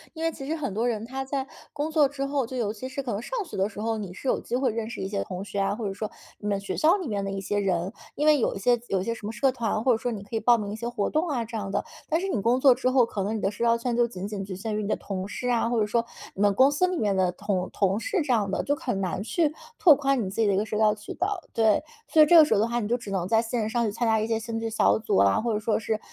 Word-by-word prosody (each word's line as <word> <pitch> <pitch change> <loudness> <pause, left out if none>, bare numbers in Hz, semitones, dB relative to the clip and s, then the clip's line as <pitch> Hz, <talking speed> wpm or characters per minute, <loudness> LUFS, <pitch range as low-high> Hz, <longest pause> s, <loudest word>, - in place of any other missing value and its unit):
因 320 - -5
为 330 - +1
其 270 -3 -8
实 315 - -1
很 275 -11 -3
多 230 +4 0
人 220 -1 -3
他 265 +2 -4
在 270 0 -3 0.3
工 300 +2 -2
作 300 -3 +4
之 275 -1 -3
后， 275 -3 -1
就 255 +1 -6
尤 215 -3 -1
其 255 +4 -7
是 275 +1 -4
可 245 - -3
能 200 - -2
上 - - -5
学 - - -9
的 195 +2 +1
时 205 - -10
候， 225 0 -1
你 200 -4 -6
是 230 - -8
有 - - +1
机 - - -3
会 255 -1 +1
认 225 -1 -3
识 - - -7
一 190 - -2
些 200 0 -2
同 185 +1 -6
学 200 - -4
啊， 195 +1 +1
或 225 0 -5
者 195 - -3
说 215 +1 -4 0.3
你 210 - -5
们 200 -1 0
学 200 - -4
校 330 +5 +4
里 365 -7 -5
面 200 -3 -2
的 195 - -3
一 195 - -3
些 205 +1 -1
人， 185 0 -1 0.2
因 295 - -1
为 305 -1 +5
有 - - 0
一 - - -4
些 240 +4 +2
有 195 - 0
一 - - -2
些 230 - -1
什 220 -2 -7
么 220 - -3
社 255 +5 +2
团， 225 -3 -2
或 255 - +4
者 - - +1
说 245 +1 -2
你 205 -3 -5
可 205 - -7
以 - - +1
报 235 +2 +5
名 205 -2 -4
一 - - -4
些 235 +2 -4
活 215 -4 -1
动 315 +2 0
啊 240 -5 -1
这 230 - -8
样 205 -3 -3
的。 195 - -1 0.2
但 320 - +2
是 385 - -2
你 235 - -1
工 240 +4 +2
作 265 -2 +7
之 255 0 0
后， 255 -2 +4
可 210 -3 -4
能 215 +2 -1
你 - - -5
的 195 - +1
社 220 - -4
交 235 0 +4
圈 235 0 -2
就 240 0 +3
仅 195 -4 -6
仅 205 -2 -4
局 190 -1 -6
限 215 +3 -4
于 215 - -1
你 200 - -3
的 - - +2
同 190 -1 -5
事 250 +4 -5
啊， 230 -1 +1
或 235 -2 +1
者 210 - +3
说 230 +3 +1 0.3
你 195 - -5
们 205 -1 +5
公 265 +5 +6
司 365 +6 +2
里 365 - -2
面 205 -8 +1
的 185 -1 +2
同 185 -1 -2
同 195 0 +1
事 410 - -1
这 260 - +1
样 210 -4 +1
的， - - -1
就 285 - +1
很 250 -9 -3
难 185 -1 -2
去 305 - 0 0.2
拓 315 -6 +7
宽 275 -1 +1
你 - - -3
自 225 - -1
己 220 - +3
的 200 - +3
一 - - +1
个 210 - +1
社 215 - -5
交 215 -1 +4
渠 210 0 -8
道。 385 +2 -1
对， 220 +1 +3 0.2
所 315 - +5
以 - - +6
这 335 +3 +7
个 310 - +9
时 - - +1
候 205 - +3
的 225 - +2
话， 235 +1 -1
你 210 - -2
就 240 - +1
只 230 -4 -8
能 185 -2 -1
在 225 +2 +3
线 230 -1 -2
上 235 +1 0
去 215 - -1
参 230 +3 -1
加 220 0 +3
一 215 - 0
些 225 -1 0
兴 225 0 -4
趣 225 - -2
小 225 - +3
组 220 - 0
啊， 100 0 +4
或 235 0 -1
者 210 - 0
说 215 0 0
是 220 0 -2
225 Hz, 375 characters per minute, -26 LUFS, 205-260 Hz, 0.3 s, 个